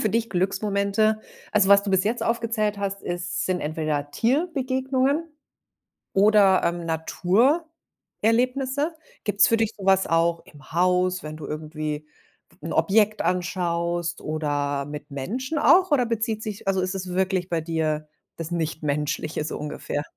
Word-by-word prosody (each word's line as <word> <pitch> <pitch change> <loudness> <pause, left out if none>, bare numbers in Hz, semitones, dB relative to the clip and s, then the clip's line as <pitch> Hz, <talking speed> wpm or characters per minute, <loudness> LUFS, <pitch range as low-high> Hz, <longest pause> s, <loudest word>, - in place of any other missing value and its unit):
für 215 - +1
dich 230 +1 0
Glücksmomente 200 +3 +1 0.3
also, 205 -2 +3
was 200 0 +7
du 200 - -3
bis 190 0 +3
jetzt 230 +3 -1
aufgezählt 230 -3 0
hast, 200 0 -3
ist 175 0 -3
sind 185 -1 0
entweder 150 -2 -2
Tierbegegnungen 265 - 0 0.9
oder, 200 -1 +5
ähm, 170 0 -1
Naturerlebnisse. 255 - 0 0.3
Gibt 205 -1 -2
es - - +9
für 230 - +3
dich 225 -1 0
so 195 - -8
was 190 0 +4
auch 165 0 +2
im 145 -1 -17
Haus, 180 +1 +2
wenn 155 0 -7
du 155 - -8
irgendwie 155 0 -5 0.6
'n 165 - -4
Objekt 210 +5 +3
anschaust 175 -1 -1
oder 145 -2 -1
mit 145 0 -8
Menschen 255 - -3
auch, 365 +1 +5
oder 255 -4 +4
bezieht 225 -1 -1
sich 210 -2 -6
also, 190 -1 +2
ist 185 +1 -2
es 185 -1 -5
wirklich 190 -1 0
bei 165 -2 0
dir 155 -2 -1 0.3
das 165 0 -5
nicht 160 -2 -2
Menschliche 150 +1 -1
so 155 - -4
ungefähr? 150 0 -4
190 Hz, 150 wpm, -24 LUFS, 160-220 Hz, 0.9 s, es